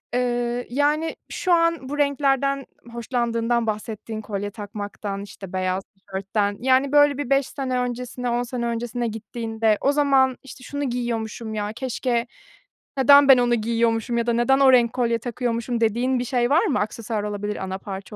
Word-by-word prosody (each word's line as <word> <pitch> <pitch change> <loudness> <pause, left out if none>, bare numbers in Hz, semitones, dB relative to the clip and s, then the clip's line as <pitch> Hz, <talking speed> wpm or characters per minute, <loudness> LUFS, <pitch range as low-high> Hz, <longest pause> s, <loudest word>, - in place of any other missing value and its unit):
ııı, 245 0 0
yani, 295 +5 +1
şu 365 -2 0
an 335 -5 +2
bu 290 - -4
renklerden 275 -1 +1 0.3
hoşlandığından 235 -1 -1
bahsettin 215 +1 -4
kolye 205 -1 -4
takmaktan, 205 -1 -6
işte, 195 -2 -10
beyaz 185 0 -1
tişörtten, 200 +1 -3
yani, 265 +2 +2
böyle, 290 -1 +5
bir 290 -3 -4
5 275 -1 +3
sene 255 -2 -2
öncesine, 250 0 -3
10 240 +1 0
sene 240 -1 -4
öncesine 235 0 -2
gittiğinde 225 0 -1
o 280 - +3
zaman 270 -3 +3
işte, 260 -1 -12
şunu 285 +2 -4
giyiyormuşum, 230 -2 -3
ya, 210 0 -2
keşke 245 -1 -1 0.7
neden 280 +1 +7
ben 260 - +9
onu 240 -1 +3
giyiyormuşum 230 +1 0
ya 235 0 0
da 235 - +2
neden 240 +4 +3
o 270 -1 +7
renk 240 -2 +4
kolye 235 -2 0
takıyormuşum 235 0 -2
dediğin 245 +4 +1
bir 245 - -1
şey 245 0 +1
var 330 +9 +4
mı? 285 -10 +1
Aksesuar 215 0 -3
olabilir, 210 0 -3
ana 190 0 -4
parça 195 +1 -8
240 Hz, 165 wpm, -23 LUFS, 220-260 Hz, 0.7 s, ben